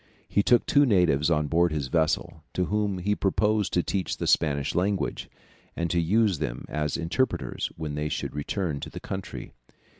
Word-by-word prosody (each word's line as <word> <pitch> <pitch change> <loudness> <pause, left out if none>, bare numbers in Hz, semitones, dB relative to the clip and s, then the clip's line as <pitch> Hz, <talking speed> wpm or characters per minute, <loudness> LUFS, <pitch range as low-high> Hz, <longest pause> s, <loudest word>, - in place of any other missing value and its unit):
He 100 - +2
took 120 +4 +4
two 145 - +4
natives 90 - +3
on 75 -2 +2
board 85 +3 +2
his 75 -3 -1
vessel, 80 0 0
to 90 - +1
whom 105 -1 0
he 100 +3 0
proposed 105 +1 +1
to 90 - +2
teach 95 -2 -2
the - - -3
Spanish 70 -3 +2
language, 95 +2 -1 0.5
and 85 -1 -1
to 85 - +2
use 100 0 +2
them 65 -5 -4
as 75 -1 -2
interpreters 90 +11 -1
when 75 -2 -4
he 75 0 -2
should - - -3
return 75 +1 -2
to - - -6
the - - -8
country. 95 0 -6
85 Hz, 180 wpm, -26 LUFS, 75-100 Hz, 0.5 s, took